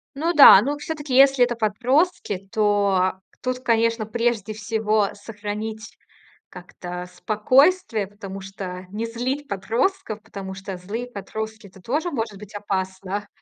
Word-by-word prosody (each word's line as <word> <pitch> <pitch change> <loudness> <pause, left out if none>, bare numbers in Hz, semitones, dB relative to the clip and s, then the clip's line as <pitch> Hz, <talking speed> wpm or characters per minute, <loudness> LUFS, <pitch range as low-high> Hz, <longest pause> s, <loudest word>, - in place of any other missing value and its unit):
Ну 330 +5 0
да. 275 -9 +10
Ну, 285 +6 -2
всё-таки, 295 -3 -4
если 270 -1 +6
это 240 -1 +1
подростки, 230 - 0
то 200 -3 +2 0.3
тут, 255 0 -2
конечно, 230 -2 +1
прежде 225 -2 -1
всего 215 -1 0
сохранить 210 +1 -6 0.5
как-то 180 0 -8
спокойствие, 255 - +2
потому 195 -1 -8
что 190 -1 -7
не 220 +3 -3
злить 255 +5 -3
подростков, 220 - -1
потому 195 -3 -8
что 195 -1 -7
злые 215 +7 -5
подростки- 220 0 -6
это 190 0 -17
тоже 300 - -1
может 225 -7 -3
быть 210 +1 -12
опасно. 195 0 -3
215 Hz, 130 wpm, -23 LUFS, 200-245 Hz, 0.5 s, да